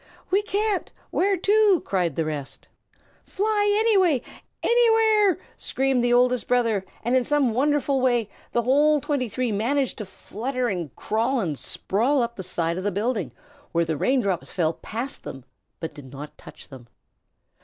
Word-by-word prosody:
"We 390 Hz, +2 st, +4 dB
can't. 415 Hz, -1 st, -1 dB, 0.2 s
Where 395 Hz, +1 st, +2 dB
to?" 405 Hz, -1 st, +3 dB
cried 175 Hz, -6 st, 0 dB
the 165 Hz, -, 0 dB
rest. 150 Hz, -3 st, -6 dB, 0.6 s
"Fly 415 Hz, +1 st, +1 dB
any 445 Hz, -3 st, +4 dB
way, 320 Hz, -10 st, +2 dB, 0.4 s
anywhere!" 445 Hz, -5 st, +4 dB, 0.2 s
screamed 265 Hz, -2 st, 0 dB
the 240 Hz, -, +2 dB
Oldest 250 Hz, 0 st, +3 dB
Brother, 230 Hz, -5 st, +1 dB, 0.2 s
and 240 Hz, +3 st, +1 dB
in 255 Hz, -, +3 dB
some 280 Hz, -4 st, +1 dB
wonderful 280 Hz, +1 st, +1 dB
way 240 Hz, -4 st, +2 dB, 0.2 s
the 235 Hz, -, +1 dB
whole 295 Hz, +5 st, +4 dB
twenty 275 Hz, -3 st, -2 dB
three 250 Hz, +1 st, -1 dB
managed 245 Hz, +6 st, 0 dB
to 215 Hz, -, -4 dB
flutter 245 Hz, +6 st, -3 dB
and 175 Hz, -, -4 dB
crawl 230 Hz, +5 st, 0 dB
and 165 Hz, -9 st, -1 dB
sprawl 240 Hz, -, 0 dB
up 235 Hz, 0 st, -4 dB
the -, -, -6 dB
side 170 Hz, -1 st, -2 dB
of -, -, -5 dB
the 205 Hz, -, 0 dB
building, 205 Hz, -, -1 dB, 0.4 s
where 170 Hz, 0 st, +2 dB
the 160 Hz, -1 st, -1 dB
rain 255 Hz, -, +2 dB
drops 190 Hz, -5 st, -2 dB
fell 165 Hz, -3 st, 0 dB
past 235 Hz, +10 st, -6 dB, 0.6 s
but 160 Hz, -, -5 dB
did 135 Hz, -4 st, -12 dB
not 145 Hz, +2 st, -9 dB
touch -, -, -13 dB
them. 130 Hz, -4 st, -12 dB
245 Hz, 165 wpm, -24 LUFS, 195-295 Hz, 0.6 s, We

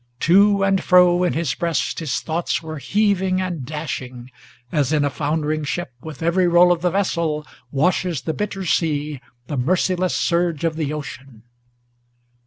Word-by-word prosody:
To 200 Hz, +3 st, +4 dB
and 195 Hz, -1 st, +2 dB
fro 180 Hz, -1 st, +5 dB
in 180 Hz, -, +1 dB
his 160 Hz, -4 st, -1 dB
breast 170 Hz, -2 st, -1 dB
his 150 Hz, -7 st, -2 dB
thoughts 165 Hz, +1 st, -2 dB
were 155 Hz, -1 st, -6 dB
heaving 190 Hz, -, +1 dB
and 180 Hz, -6 st, -3 dB
dashing, 130 Hz, -4 st, -6 dB, 0.4 s
As 145 Hz, -4 st, +1 dB
in 150 Hz, -2 st, +2 dB
a 145 Hz, -, -1 dB
foundering 155 Hz, +1 st, -1 dB
ship, 150 Hz, -1 st, -4 dB
with 160 Hz, -1 st, -8 dB
every 175 Hz, +2 st, +2 dB
roll 175 Hz, +1 st, +5 dB
of 175 Hz, -2 st, +1 dB
the 180 Hz, -, +2 dB
vessel, 170 Hz, -5 st, -1 dB, 0.2 s
Washes 170 Hz, +2 st, 0 dB
the 160 Hz, +4 st, -3 dB
bitter 195 Hz, -1 st, -4 dB
sea, 150 Hz, -4 st, -1 dB, 0.2 s
the 145 Hz, -, -4 dB
merciless 180 Hz, +6 st, +1 dB
surge 170 Hz, -3 st, 0 dB
of 165 Hz, -1 st, 0 dB
the 155 Hz, -3 st, -2 dB
ocean! 135 Hz, -6 st, -8 dB
165 Hz, 160 wpm, -21 LUFS, 150-180 Hz, 0.4 s, fro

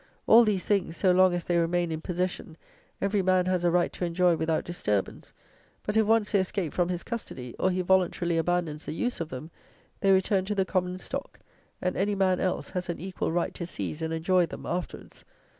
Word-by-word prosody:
"All 235 Hz, +2 st, +8 dB
these 205 Hz, -5 st, 0 dB
things, 195 Hz, -5 st, 0 dB
so 185 Hz, -, +3 dB
long 185 Hz, 0 st, +5 dB
as 175 Hz, -, -3 dB
they 175 Hz, 0 st, +1 dB
remain 170 Hz, 0 st, 0 dB
in 160 Hz, 0 st, -3 dB
possession, 180 Hz, -2 st, -3 dB, 0.4 s
every 200 Hz, 0 st, +1 dB
man 185 Hz, -1 st, +3 dB
has 185 Hz, -1 st, 0 dB
a 175 Hz, -, +4 dB
right 175 Hz, 0 st, +1 dB
to -, -, -5 dB
enjoy 175 Hz, 0 st, +3 dB
without 160 Hz, 0 st, 0 dB
disturbance; 105 Hz, -, -2 dB, 0.5 s
but 210 Hz, -, -2 dB
if 220 Hz, -1 st, +3 dB
once 225 Hz, -1 st, +3 dB
they 200 Hz, -, +4 dB
escape 185 Hz, -3 st, -2 dB
from 175 Hz, -1 st, +1 dB
his 175 Hz, -1 st, -3 dB
custody, 130 Hz, -, -6 dB
or 185 Hz, -, +3 dB
he 185 Hz, 0 st, 0 dB
voluntarily 175 Hz, -2 st, +2 dB
abandons 165 Hz, -3 st, -1 dB
the -, -, -3 dB
use 245 Hz, +4 st, -2 dB
of 160 Hz, -, -4 dB
them, 135 Hz, +6 st, -7 dB, 0.5 s
they 195 Hz, -, +3 dB
return 190 Hz, 0 st, +3 dB
to 210 Hz, +2 st, -2 dB
the 190 Hz, -1 st, +1 dB
common 180 Hz, -1 st, -1 dB
stock, -, -, -6 dB, 0.4 s
and 180 Hz, -, 0 dB
any 200 Hz, +2 st, 0 dB
man 185 Hz, -2 st, +2 dB
else 185 Hz, -, -2 dB
has 180 Hz, -1 st, -3 dB
an 170 Hz, -, -3 dB
equal 185 Hz, -1 st, -3 dB
right 175 Hz, +1 st, -1 dB
to 170 Hz, -, -5 dB
seize 165 Hz, -2 st, -5 dB
and 160 Hz, 0 st, -2 dB
enjoy 175 Hz, +2 st, +2 dB
them -, -, -9 dB
afterwards." 175 Hz, 0 st, -5 dB
180 Hz, 210 wpm, -27 LUFS, 170-190 Hz, 0.5 s, All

